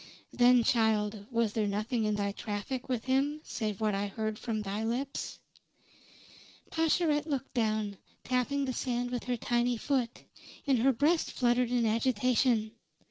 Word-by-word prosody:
"Then, 245 Hz, 0 st, +5 dB
child, 215 Hz, -3 st, +1 dB
was 230 Hz, -3 st, 0 dB
there 215 Hz, -2 st, 0 dB
nothing 215 Hz, +3 st, -1 dB
in 210 Hz, 0 st, +1 dB
thy 200 Hz, -1 st, -1 dB
traffic 215 Hz, +6 st, -5 dB
with 245 Hz, -3 st, -1 dB
him 275 Hz, +3 st, +1 dB
save 215 Hz, -4 st, -3 dB
what 215 Hz, -1 st, +1 dB
I 200 Hz, +1 st, -1 dB
heard 215 Hz, +1 st, -3 dB
from 220 Hz, -3 st, -2 dB
thy 205 Hz, +2 st, -3 dB
lips?" 255 Hz, +5 st, -3 dB, 1.3 s
Pascherette 320 Hz, -2 st, +2 dB
looked 275 Hz, -3 st, -3 dB
down, 215 Hz, -4 st, 0 dB, 0.2 s
tapping 265 Hz, +3 st, 0 dB
the 260 Hz, -, -2 dB
sand 245 Hz, -1 st, -2 dB
with 245 Hz, -2 st, -3 dB
her 245 Hz, -1 st, -1 dB
tiny 240 Hz, +1 st, +1 dB
foot, 250 Hz, -1 st, -1 dB, 0.4 s
and 270 Hz, -4 st, +3 dB
her 265 Hz, +4 st, +4 dB
breast 300 Hz, +7 st, +2 dB
fluttered 245 Hz, -1 st, +2 dB
in 245 Hz, -1 st, +1 dB
agitation. 230 Hz, 0 st, +2 dB
240 Hz, 150 wpm, -30 LUFS, 215-260 Hz, 1.3 s, Then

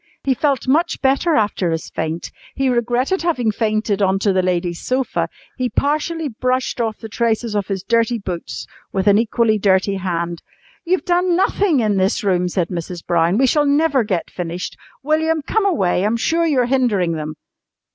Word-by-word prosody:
He 270 Hz, -, +2 dB
felt 275 Hz, -1 st, 0 dB
much 310 Hz, +6 st, +2 dB
better 275 Hz, +5 st, +2 dB
after 205 Hz, -6 st, +1 dB
his 165 Hz, 0 st, -3 dB
faint. 160 Hz, +1 st, -4 dB, 0.2 s
He 270 Hz, -1 st, +1 dB
regretted 245 Hz, -, 0 dB
having 255 Hz, -10 st, +1 dB
fainted 215 Hz, -1 st, 0 dB
on 190 Hz, 0 st, +3 dB
to 195 Hz, 0 st, +1 dB
the 185 Hz, -, +2 dB
lady's 175 Hz, -1 st, -1 dB
sofa. 255 Hz, 0 st, -1 dB, 0.3 s
He 255 Hz, -2 st, -1 dB
partially 305 Hz, +4 st, -1 dB
brushed 255 Hz, 0 st, -1 dB
off 220 Hz, -2 st, -1 dB
the 225 Hz, -, -8 dB
traces 225 Hz, 0 st, -1 dB
of 205 Hz, -2 st, -1 dB
his 195 Hz, -2 st, -3 dB
dirty 230 Hz, +2 st, +1 dB
boots 185 Hz, -5 st, -5 dB, 0.3 s
with 190 Hz, -1 st, -1 dB
an 205 Hz, 0 st, +5 dB
equally 225 Hz, -1 st, +1 dB
dirty 195 Hz, 0 st, +2 dB
hand. 170 Hz, -2 st, -3 dB, 0.4 s
"You've 365 Hz, +2 st, 0 dB
done 355 Hz, 0 st, +2 dB
nothing 365 Hz, -5 st, +2 dB
in 210 Hz, -3 st, +1 dB
this 190 Hz, +4 st, +1 dB
room," 180 Hz, -3 st, +1 dB
said 175 Hz, -1 st, -1 dB
Mrs. 175 Hz, 0 st, -5 dB
Brown. 170 Hz, +2 st, +2 dB
"We 265 Hz, -, +4 dB
shall 295 Hz, +3 st, +2 dB
never 285 Hz, -2 st, +3 dB
get 190 Hz, -6 st, -2 dB
finished. 175 Hz, 0 st, -5 dB, 0.3 s
William, 315 Hz, +1 st, +1 dB
come 425 Hz, +6 st, +1 dB
away! 190 Hz, -, +1 dB
I'm 215 Hz, +3 st, +1 dB
sure 330 Hz, +7 st, +1 dB
you're 265 Hz, -6 st, +2 dB
hindering 235 Hz, -9 st, +1 dB
them." 155 Hz, -1 st, -4 dB
225 Hz, 175 wpm, -19 LUFS, 190-275 Hz, 0.4 s, an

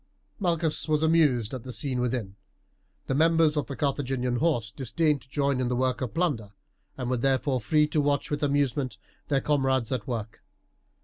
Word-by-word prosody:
Malchus 170 Hz, -5 st, 0 dB
was 155 Hz, 0 st, +1 dB
amused 150 Hz, -9 st, +3 dB
at 130 Hz, -, -4 dB
the 130 Hz, -, -7 dB
scene 130 Hz, 0 st, -1 dB
within. 120 Hz, -6 st, -2 dB, 0.7 s
The -, -, -1 dB
members 160 Hz, +1 st, +4 dB
of 150 Hz, -, -1 dB
the 140 Hz, -, -5 dB
Carthaginian 130 Hz, -3 st, -1 dB
horse 120 Hz, -8 st, +1 dB
disdained 145 Hz, +3 st, 0 dB
to -, -, -20 dB
join 140 Hz, -2 st, 0 dB
in 130 Hz, -, 0 dB
the 125 Hz, -, 0 dB
work 130 Hz, 0 st, 0 dB
of 130 Hz, +2 st, -4 dB
plunder, 135 Hz, -, -1 dB, 0.4 s
and 130 Hz, -2 st, -3 dB
were, 125 Hz, 0 st, 0 dB
therefore, 130 Hz, +1 st, +1 dB
free 150 Hz, +7 st, +3 dB
to 150 Hz, 0 st, +1 dB
watch 145 Hz, 0 st, 0 dB
with 145 Hz, -, -1 dB
amusement 140 Hz, -4 st, 0 dB, 0.3 s
their 140 Hz, -2 st, +1 dB
comrades 135 Hz, -5 st, +1 dB
at 125 Hz, -5 st, -2 dB
work. 115 Hz, -3 st, -5 dB
135 Hz, 180 wpm, -27 LUFS, 125-150 Hz, 0.7 s, members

